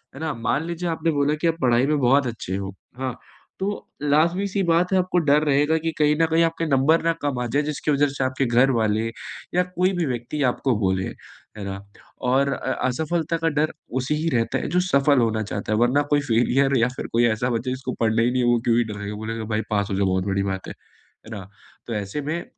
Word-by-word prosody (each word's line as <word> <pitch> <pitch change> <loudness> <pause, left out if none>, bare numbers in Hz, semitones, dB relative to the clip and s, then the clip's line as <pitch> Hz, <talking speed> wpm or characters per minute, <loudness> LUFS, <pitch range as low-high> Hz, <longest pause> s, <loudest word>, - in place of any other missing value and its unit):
है - - -9
ना? 160 -1 -2
मान 120 +6 -1
लीजिए, 170 +1 -3
आपने 165 0 0
बोला 145 0 +1
कि 170 - +2
आप 165 - +1
पढ़ाई 125 0 +3
में 150 - +2
बहुत 135 +2 +3
अच्छे 110 -5 -4
हो, 95 -1 -4 0.3
हाँ। 130 -2 -3 0.4
तो 195 - -1 0.3
लाज़मी-सी 170 +7 +1
बात 170 +1 +2
है - - +4
आपको 180 0 0
डर 150 -1 +3
रहेगा 150 +2 +2
कि 165 - 0
कहीं 150 0 +3
न - - +5
कहीं 165 +1 +4
आपके 165 0 0
नंबर 140 +4 +3
ना 165 - +3
कम 140 -4 -1
आ - - -1
जाए 145 - +3
जिसकी 150 0 -2
वजह 145 0 +3
से 135 -1 -3
आपके 130 +1 0
घरवाले 115 -3 +2 0.5
या 180 - +4
कोई 185 +2 +2
भी 170 - +1
व्यक्ति 125 +3 -3
आपको 125 0 +1
बोले, 95 -2 +1
है 105 - -12
ना? 95 0 -5 0.5
और 135 +2 +2
अ - - -3 0.2
असफलता 160 +5 -1
का 165 0 0
डर 150 +1 0 0.3
उसे 135 +4 -1
ही 155 +2 -2
रहता 115 -5 0
है - - -3
जो 180 +4 +2
सफल 145 -6 +3
होना 110 -2 +1
चाहता 100 0 -4
है, - - +2
वरना 125 +4 +3
कोई 145 - +3
फ़ेलियर 135 +2 +2
या 115 0 +3
फिर - - -5
कोई 120 +1 +3
ऐसा 120 +2 +1
बच्चा 120 +2 -2
जिसको 130 0 -4
पढ़ना 115 0 +2
ही 120 - +2
नहीं 130 0 +1
है 120 - +2
वो 120 -1 +3
क्यों 115 -1 +3
ही 120 - +4
डरेगा। 105 0 -5
बोलेगा 110 +1 -5
भाई 110 - +1
पास 100 -2 0
हो 95 - 0
जाओ 100 - +1
बहुत 95 0 0
बड़ी 100 0 0
बात 95 -1 -4
है। - - -6 0.5
है 110 - -12
ना? 95 -1 -9 0.4
तो 115 - -3
ऐसे 105 +7 -3
में 160 +4 -3
135 Hz, 235 wpm, -23 LUFS, 115-155 Hz, 0.5 s, न